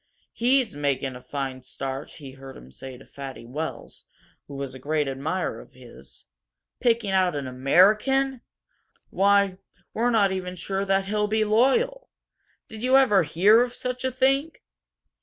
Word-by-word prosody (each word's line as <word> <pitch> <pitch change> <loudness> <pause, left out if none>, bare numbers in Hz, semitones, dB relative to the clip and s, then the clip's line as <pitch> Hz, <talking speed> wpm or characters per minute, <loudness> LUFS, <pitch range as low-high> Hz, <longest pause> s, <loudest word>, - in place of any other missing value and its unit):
"He's 250 - +1
making 140 -2 -1
a 125 - -10
fine 135 -2 -5
start," 135 +2 -6
he 140 -4 -11
heard 135 0 -12
him 65 +1 -14
say 130 - -9
to 135 - -16
Fatty 135 -4 -9
Wells, 130 -1 -7 0.4
who 140 - -9
was 140 -1 -5
a 130 - -9
great 150 +2 -1
admirer 140 +7 -3
of - - -18
his. - - -14 0.5
"Picking 230 -4 +1
out 185 -3 +2
an 140 -1 -3
AMERICAN! 215 - +3 0.7
Why, 200 -1 +3 0.3
we're 235 +2 +1
not 210 -5 +3
even 185 -1 -4
sure 195 +2 -3
that 195 0 +1
he'll 210 +1 0
be 215 +1 +1
loyal! 275 - +2 0.6
Did 220 -1 -9
you 255 +2 +4
ever 220 -8 +5
hear 190 +8 +4
of 245 0 -2
such 250 0 -4
a 260 - 0
thing?" 270 +4 +1
190 Hz, 160 wpm, -25 LUFS, -, 0.7 s, ever